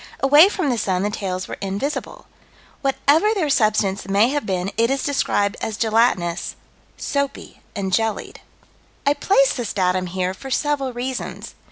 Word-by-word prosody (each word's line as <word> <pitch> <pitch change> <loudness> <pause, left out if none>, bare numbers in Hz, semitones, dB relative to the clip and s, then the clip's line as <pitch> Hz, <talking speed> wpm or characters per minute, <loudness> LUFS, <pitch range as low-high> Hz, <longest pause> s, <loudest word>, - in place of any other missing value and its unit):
Away 290 +7 +7
from 345 -9 -1
the 240 - -1
sun 185 -2 0
the 205 - 0
tails 185 -3 -4
were - - -7
invisible. 200 +10 -4 0.6
Whatever 300 +9 +2
their 315 -8 0
substance 210 -5 +1
may 200 +4 +3
have 290 -4 -2
been, 190 0 -1
it 230 +1 +2
is 275 0 0
described 205 -8 0
as 215 -1 -3
gelatinous 220 -7 +1 0.4
"soapy 280 -1 -3
and 190 -2 -3
jellied." 225 +1 -1 0.6
I 285 - +4
place 275 -4 +3
this 240 -5 -4
datum 185 -1 +1
here 185 +1 -2
for 270 +7 -9
several 275 0 0
reasons. 250 +1 -5
225 Hz, 155 wpm, -21 LUFS, 195-275 Hz, 0.6 s, Away